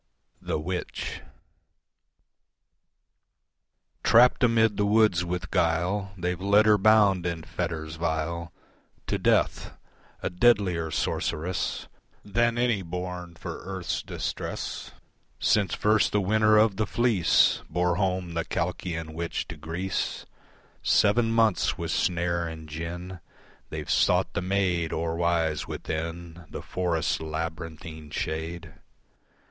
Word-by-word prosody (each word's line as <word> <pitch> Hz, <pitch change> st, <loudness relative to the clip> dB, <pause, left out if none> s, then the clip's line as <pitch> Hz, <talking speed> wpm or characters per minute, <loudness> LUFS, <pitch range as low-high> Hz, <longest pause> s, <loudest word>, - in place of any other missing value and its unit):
The -, -, -2 dB
Witch 90 Hz, +4 st, -4 dB, 2.8 s
Trapped 125 Hz, +3 st, +5 dB
amid 115 Hz, -3 st, +4 dB
the 105 Hz, -, +2 dB
woods 105 Hz, -5 st, +4 dB
with 90 Hz, +1 st, -4 dB
guile 90 Hz, +4 st, +1 dB
They've 90 Hz, 0 st, -2 dB
led 100 Hz, +2 st, +4 dB
her 105 Hz, -1 st, +5 dB
bound 100 Hz, -4 st, +4 dB
in 85 Hz, -1 st, -3 dB
fetters 80 Hz, -3 st, -4 dB
vile 85 Hz, +1 st, -2 dB, 0.5 s
To -, -, -1 dB
death, -, -, +1 dB, 0.5 s
a -, -, -1 dB
deadlier 90 Hz, -5 st, +3 dB
sorceress 85 Hz, +3 st, -2 dB, 0.4 s
Than 120 Hz, +3 st, +1 dB
any 120 Hz, -4 st, +2 dB
born 90 Hz, 0 st, -6 dB
for -, -, -7 dB
earth's 95 Hz, -2 st, -3 dB
distress -, -, -4 dB, 0.5 s
Since 100 Hz, -5 st, +2 dB
first 110 Hz, +1 st, +2 dB
the 105 Hz, -, +3 dB
winner 110 Hz, +2 st, +4 dB
of 105 Hz, -2 st, +4 dB
the 110 Hz, 0 st, 0 dB
fleece 115 Hz, -8 st, +3 dB
Bore 90 Hz, +1 st, +1 dB
home 95 Hz, -3 st, -1 dB
the 85 Hz, 0 st, -1 dB
Colchian 80 Hz, -2 st, -3 dB
witch 85 Hz, +1 st, -3 dB
to -, -, -6 dB
Greece 85 Hz, +5 st, -3 dB, 0.6 s
Seven 115 Hz, +2 st, +3 dB
months 115 Hz, -4 st, +2 dB
with 85 Hz, -1 st, -3 dB
snare 85 Hz, 0 st, 0 dB
and 80 Hz, -1 st, -8 dB
gin 85 Hz, +4 st, -6 dB, 0.5 s
They've -, -, -5 dB
sought -, -, +2 dB
the -, -, -1 dB
maid 90 Hz, -3 st, 0 dB
o'erwise 80 Hz, -1 st, 0 dB
within 85 Hz, +1 st, -5 dB
The -, -, -7 dB
forest's 85 Hz, -3 st, -1 dB
labyrinthine 80 Hz, -1 st, -6 dB
shade. 80 Hz, +3 st, -4 dB
90 Hz, 115 wpm, -27 LUFS, 80-100 Hz, 2.8 s, Trapped